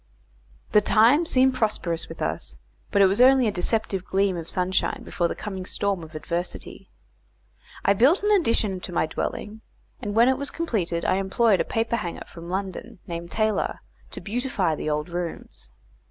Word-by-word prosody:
The 210 - +6
times 240 +11 +4
seemed 260 0 +4
prosperous 200 -8 -1
with 165 - -6
us, 75 -5 -3 0.3
but 200 - +4
it - - +8
was 195 +5 +3
only 260 -1 +6
a - - +1
deceptive 195 0 -1
gleam 195 0 +1
of 165 -1 -6
sunshine 185 +1 -1
before 175 - -1
the - - -4
coming 190 -3 -5
storm 195 0 -1
of 160 -1 -11
adversity. 170 +3 -5 1.0
I 200 - +5
built 270 - +4
an 415 - +2
addition 230 - +2
to 180 - -7
my 165 - +1
dwelling; 210 +6 -4 0.4
and 205 0 -4
when 230 +2 +6
it 260 0 +2
was 280 - -2
completed 190 - -2
I 185 - +2
employed 195 +1 +2
a - - +2
paperhanger 225 -6 -2
from 170 0 -10
London 190 +1 -4
named 170 0 -6
Taylor, 215 +1 0 0.3
to - - -7
beautify 215 -6 -1
the 155 - -3
old 150 +1 -1
rooms. 175 -1 -6
195 Hz, 170 wpm, -25 LUFS, 175-230 Hz, 1.0 s, it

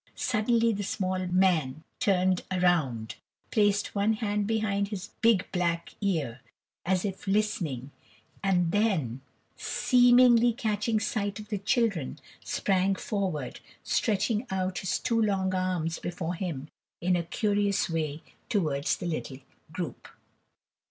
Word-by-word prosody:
Suddenly 230 0 +2
the 205 - -3
small 185 -2 -2
man 170 -6 +2 0.2
turned 185 -2 +2
round, 160 -12 +1 0.3
placed 205 -2 +2
one 205 +2 +2
hand 210 -2 -1
behind 210 -3 0
his 205 0 -6
big 225 -5 +4
black 170 -2 -1
ear, 155 - -1 0.5
as 185 +1 +1
if 195 0 -5
listening, 170 - -1 0.5
and 180 -3 +2
then, 170 - +1 0.4
seemingly 245 -1 +5
catching 215 0 0
sight 205 -2 -2
of 210 0 -10
the 205 -2 -2
children, 200 - 0 0.3
sprang 195 0 +1
forward, 185 - -3 0.2
stretching 220 +3 0
out 185 -1 -1
his 190 - -1
two 230 -2 0
long 190 -3 +1
arms 180 -3 -1
before 175 -1 -3
him 165 -6 -4 0.3
in 180 +1 +2
a 175 - +1
curious 205 +3 0
way 155 -2 -3 0.3
towards 155 - 0
the - - -6
little 155 -5 -3 0.3
group. 165 0 -5
190 Hz, 125 wpm, -28 LUFS, 170-210 Hz, 0.5 s, seemingly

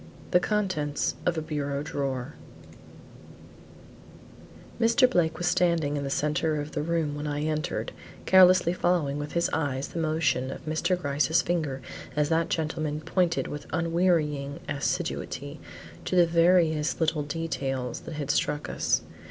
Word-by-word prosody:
THE 180 - +6
CONTENTS 185 -8 -1
OF 175 -2 +1
A 160 - -1
BUREAU 145 -2 -2
DRAWER 135 -2 -3 2.5
Mr. 235 +3 +5
Blake 170 -9 +1
was 175 - -3
standing 170 -4 +2
in 145 - -2
the 140 - -3
centre 150 +2 0
of 145 +1 -5
the 150 - -2
room 160 -2 -1
when 145 +1 -4
I 145 0 -2
entered, 155 0 -2 0.3
carelessly 185 -2 +6
following 165 -6 0
with 145 0 -5
his 170 0 +2
eyes 140 -3 -1
the 170 - -5
motion 155 -5 +1
of - - -8
Mr. 175 +4 0
Gryce's 150 +1 +1
finger 155 -7 -2 0.3
as 150 0 +1
that 165 0 +1
gentleman 155 -2 -2
pointed 170 +1 0
with 145 0 -7
unwearying 160 -4 +1
assiduity 140 - -3 0.5
to - - -1
the 175 -1 +6
various 165 -2 +3
little 160 -2 +1
details 140 -5 -3
that 165 - -8
had 145 -2 -1
struck 150 0 -1
us. - - +1
155 Hz, 145 wpm, -27 LUFS, 145-170 Hz, 2.5 s, THE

